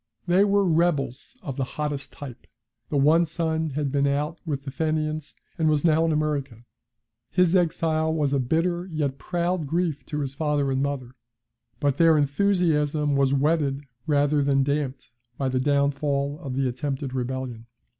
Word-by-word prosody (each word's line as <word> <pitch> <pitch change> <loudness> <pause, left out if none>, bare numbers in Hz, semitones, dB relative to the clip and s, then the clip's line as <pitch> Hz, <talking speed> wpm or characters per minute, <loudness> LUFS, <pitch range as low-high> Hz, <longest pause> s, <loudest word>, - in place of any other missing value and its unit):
They 180 +3 +4
were 200 -1 +3
rebels 160 - 0
of 140 -6 -5
the 135 - 0
hottest 145 -2 -3
type. 135 -5 -10 0.4
The 145 - 0
one 160 +5 +4
son 160 0 -1
had 145 -2 -1
been 140 0 +2
out 150 +4 -1
with 140 -3 -2
the 135 - -6
Fenians 155 0 -2 0.2
and 160 -1 +3
was 150 +1 +1
now 160 0 +4
in 165 - +1
America. 140 -6 -2 0.6
His 180 -1 +3
exile 160 -2 +1
was 150 -3 0
a 140 - +2
bitter 170 +7 0
yet 145 -6 -2
proud 175 -1 -1
grief 165 -1 -1
to 150 0 -3
his 135 -1 -3
father 145 -2 0
and 135 0 0
mother; 135 -3 -3 0.7
but 140 -1 +1
their 165 -2 +5
enthusiasm 150 -2 +1
was 140 0 +3
whetted 145 -1 +1 0.3
rather 145 0 +3
than 135 -1 +3
damped 140 -2 -2 0.3
by 135 -1 0
the 130 0 0
downfall 140 +1 0
of 135 -5 -5
the 135 0 +1
attempted 135 +1 -3
rebellion. 125 -2 -4
145 Hz, 165 wpm, -25 LUFS, 140-160 Hz, 0.7 s, their